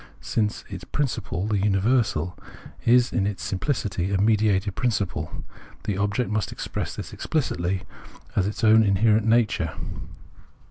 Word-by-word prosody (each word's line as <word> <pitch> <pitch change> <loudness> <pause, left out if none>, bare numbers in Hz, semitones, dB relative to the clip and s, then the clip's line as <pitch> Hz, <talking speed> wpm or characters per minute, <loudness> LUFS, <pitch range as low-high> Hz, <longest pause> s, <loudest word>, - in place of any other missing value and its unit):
Since 105 -2 -1
its - - -7
principle, 115 - -2
the 105 -2 +1
universal, 100 - +1 0.5
is 120 +1 +4
in 100 - +1
its 105 -2 -4
simphcity 95 -4 -1
a 95 - +1
mediated 105 -2 +2
principle, 105 -5 -2 0.4
the 105 - -1
object 105 +4 0
must 105 -2 -1
express - - -4
this - - -7
explicitly 95 - -1 0.5
as 95 -1 +2
its 105 +3 -4
own 110 0 +7
inherent 110 +2 +3
natiu 115 -1 +3
e. - - -7
105 Hz, 135 wpm, -25 LUFS, 95-115 Hz, 0.5 s, own